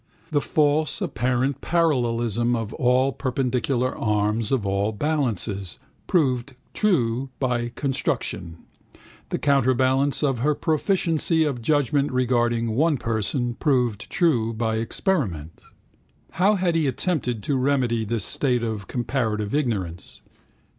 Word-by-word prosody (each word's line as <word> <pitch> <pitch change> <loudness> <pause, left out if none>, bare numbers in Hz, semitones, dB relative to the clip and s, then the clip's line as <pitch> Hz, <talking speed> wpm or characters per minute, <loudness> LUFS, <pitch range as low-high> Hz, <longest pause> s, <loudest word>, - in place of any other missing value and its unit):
The 145 -2 +2
false 150 +1 +1
apparent 130 +3 -1
parallelism 120 - +1
of 115 -2 -4
all 130 +2 +2
perpendicular 130 -1 -1
arms 105 +1 0
of 130 -7 +1
all 100 +2 0
balances, 110 - -2 0.3
proved 130 -6 +1 0.2
true 135 - +1
by 120 -3 0
construction. 130 - -2 0.7
The - - -1
counterbalance 135 +1 +2
of 135 -5 +1
her 150 +4 +2
proficiency 165 0 +1
of 140 -6 -2
judgment 145 +1 +1
regarding 120 -2 +1
one 150 +6 +2
person, 120 +2 -1
proved 125 -6 0
true 120 -10 +2
by 110 0 -1
experiment. 110 - -2 0.7
How 200 +4 +3
had 180 -3 +1
he 160 -3 +1
attempted 125 - -1
to 140 - 0
remedy 130 -4 +1
this 110 -1 -2
state 125 -4 0
of 110 -4 -3
comparative 110 -4 -2
ignorance? 105 - -2
125 Hz, 115 wpm, -24 LUFS, 115-145 Hz, 0.7 s, How